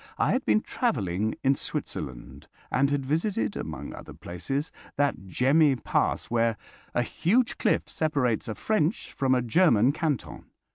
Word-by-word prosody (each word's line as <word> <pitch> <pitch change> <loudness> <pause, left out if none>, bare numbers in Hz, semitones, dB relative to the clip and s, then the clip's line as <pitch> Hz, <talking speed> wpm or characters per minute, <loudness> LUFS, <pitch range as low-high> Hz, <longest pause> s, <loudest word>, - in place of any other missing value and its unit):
I - - +2
had 255 - 0
been 215 - +4
travelling 110 - -1
in 135 0 +4
Switzerland - - -5 0.2
and 140 +1 +3
had 140 -2 -1
visited, 145 - 0
among - - -5
other - - -10
places, 135 - -4 0.2
that 140 -9 0
Gemmi 140 - +4
Pass, - - +1
where 115 -1 +1 0.4
a 120 - +3
huge 225 - +1
cliff - - +1
separates 140 -8 0
a 110 - -3
French 210 - 0
from 130 -1 +2
a 125 - +1
German 125 - +4
canton. 150 -4 -3
135 Hz, 145 wpm, -27 LUFS, 115-155 Hz, 0.4 s, been